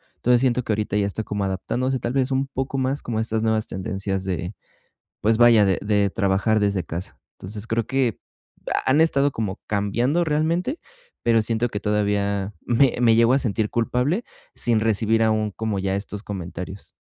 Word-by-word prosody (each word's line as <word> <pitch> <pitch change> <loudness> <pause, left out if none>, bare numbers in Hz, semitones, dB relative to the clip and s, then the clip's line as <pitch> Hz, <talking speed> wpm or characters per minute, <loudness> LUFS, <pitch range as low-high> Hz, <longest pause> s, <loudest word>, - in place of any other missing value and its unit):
Entonces, 125 0 +3
siento 125 -1 +1
que 110 - -3
ahorita 105 -1 -1
ya 100 - +2
está 100 +2 -3
como 105 -1 -3
adaptándose, 125 +7 -1
tal 120 - -3
vez 135 0 +1
un 135 +1 0
poco 135 0 -3
más 130 +2 -1
como 115 -2 -3
a - - +1
estas 110 0 -1
nuevas 110 -1 +1
tendencias 95 0 -3
de 90 +1 -3 0.7
pues 110 +1 +3
vaya, 120 -3 +7
de 95 -2 +2
de 105 -1 +1
trabajar 100 +2 +1
desde 100 -4 0
casa. 85 +4 -7 0.2
Entonces, 105 +3 -7
creo 115 -1 -1
que 130 -4 0 0.6
ha - - 0
han 145 - +4
estado 145 -3 +3
como 105 -5 -4
cambiando 120 - +1
realmente, 165 - 0 0.4
pero 115 -1 +3
siento 115 +2 0
que 105 - -4
todavía 100 -1 0
me 125 +2 +3
me 115 -2 +5
llego 115 +2 +4
a - - +4
sentir 110 -4 -1
culpable 125 - 0 0.3
sin 115 -2 +2
recibir 110 +1 +2
aún 110 -1 +1
como, 110 -2 -2
ya 95 0 -1
estos 100 0 -5
comentarios. 95 0 -7
110 Hz, 185 wpm, -23 LUFS, 100-125 Hz, 0.7 s, vaya